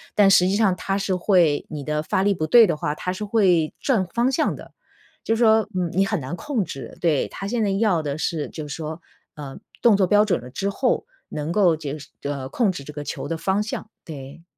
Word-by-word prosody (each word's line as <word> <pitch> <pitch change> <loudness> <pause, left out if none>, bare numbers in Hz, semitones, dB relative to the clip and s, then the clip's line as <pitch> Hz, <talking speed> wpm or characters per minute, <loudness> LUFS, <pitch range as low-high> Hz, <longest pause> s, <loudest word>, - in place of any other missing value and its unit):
但 205 -2 +6
实 180 -1 +5
际 195 - +1
上 205 -4 +3
它 195 +2 -2
是 195 -1 -1
会 175 -5 +2
你 150 -3 -6
的 150 +1 -2
发 190 - 0
力 205 - +3
不 155 - -2
对 230 +5 +7
的 170 - -1
话， 150 - -2
它 180 - -3
是 210 +3 -5
会 185 -7 +2
转 225 -9 +1
方 240 +3 +2
向 - - 0
的。 - - -12 0.5
就 225 - +1
说， 220 -1 +4
嗯， 180 -2 0
你 195 +2 +3
很 210 -2 -1
难 135 +5 -5
控 235 -2 -2
制， 135 - -8
对， 160 -5 +2
他 195 - -6
现 230 0 0
在 205 - +1
要 195 -4 +2
的 145 0 -3
是 155 -2 -2
就 155 -2 -7
说， 155 +2 -6 0.3
呃， 140 -3 -8 0.2
动 230 -3 +6
作 190 - +3
标 210 +3 +5
准 205 - +1
了 125 - -10
之 195 +10 -2
后， 250 +5 0 0.2
能 150 +2 -4
够 180 -3 +4
就是 150 -1 -7
呃， 140 -2 -3
控 220 - +1
制 160 -6 -7
这 150 - -9
个 145 - -6
球 - - -5
的 165 - -3
方 195 +4 0
向， 215 0 -6 0.2
对。 145 +1 -9
180 Hz, 250 characters per minute, -23 LUFS, 150-210 Hz, 0.5 s, 对